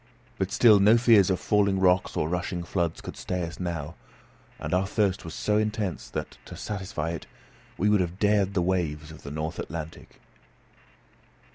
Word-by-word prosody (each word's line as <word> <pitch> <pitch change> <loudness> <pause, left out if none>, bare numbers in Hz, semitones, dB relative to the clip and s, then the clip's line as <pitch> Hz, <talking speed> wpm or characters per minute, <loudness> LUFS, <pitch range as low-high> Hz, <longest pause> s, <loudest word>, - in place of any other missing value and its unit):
But 95 0 -1
still 115 -3 +6
no 105 +4 +6
fears 115 -6 +5
of 95 -2 +1
falling 100 -1 +2
rocks 90 -1 +2
or 75 - +1
rushing 90 +1 -2
floods 85 -2 -2
could - - -8
stay 90 -1 -3
us 85 0 -6
now; 85 -4 -4 0.6
and - - -4
our 95 +1 +2
thirst 100 -2 0
was 80 -1 -7
so 105 0 +1
intense 105 -5 -2
that, - - -6
to - - -10
satisfy 95 -6 -4
it, 85 - -6 0.5
we 105 - +1
would 105 -2 +4
have 90 0 -3
dared 100 -1 +2
the 90 - +2
waves 80 -4 -1
of 80 - -12
the 70 - -8
north 80 +2 -4
Atlantic. 80 -1 -7
90 Hz, 175 wpm, -27 LUFS, 85-100 Hz, 0.6 s, still